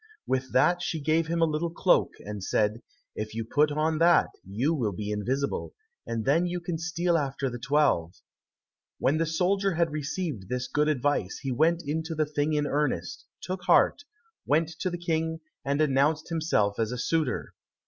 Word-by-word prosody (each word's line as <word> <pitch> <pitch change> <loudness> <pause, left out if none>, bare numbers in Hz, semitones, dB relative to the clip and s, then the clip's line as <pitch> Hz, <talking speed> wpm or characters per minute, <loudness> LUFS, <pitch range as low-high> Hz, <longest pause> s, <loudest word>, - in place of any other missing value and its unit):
With 130 0 -1
that 175 0 +3
she 175 -2 -2
gave 160 +2 +1
him 165 0 +1
a - - +6
little 160 +2 -1
cloak, 175 +2 +2
and 105 -2 -6
said, 105 +3 0 0.3
"If 110 0 -5
you 115 -1 -3
put 150 +5 +2
on 155 +1 0
that, 170 +1 +5
you 115 - 0
will 115 -10 -1
be 105 +3 -4
invisible, 130 +7 -2 0.3
and 115 -1 -3
then 165 +6 +3
you 175 0 -2
can 170 -1 -4
steal 170 0 +1
after 135 -2 -2
the 120 - -6
twelve." 135 - +1 0.8
When 145 +4 +2
the 165 0 0
soldier 190 +3 +1
had 170 -1 +1
received 150 - -4
this 125 0 -2
good 150 +1 +1
advice, 145 -9 0
he 135 - -2
went 165 +6 +2
into 160 +3 -2
the 155 0 +1
thing 150 +1 -1
in 150 -1 +1
earnest, 140 - -2 0.2
took 185 0 -4
heart, - - +4 0.4
went 155 +2 +2
to 185 - 0
the 175 - -4
King, 160 -1 -1 0.2
and 140 +1 0
announced 155 +2 +2
himself 155 -12 +1
as 110 0 0
a 125 - -3
suitor. 150 +2 -1
150 Hz, 180 wpm, -27 LUFS, 125-165 Hz, 0.8 s, a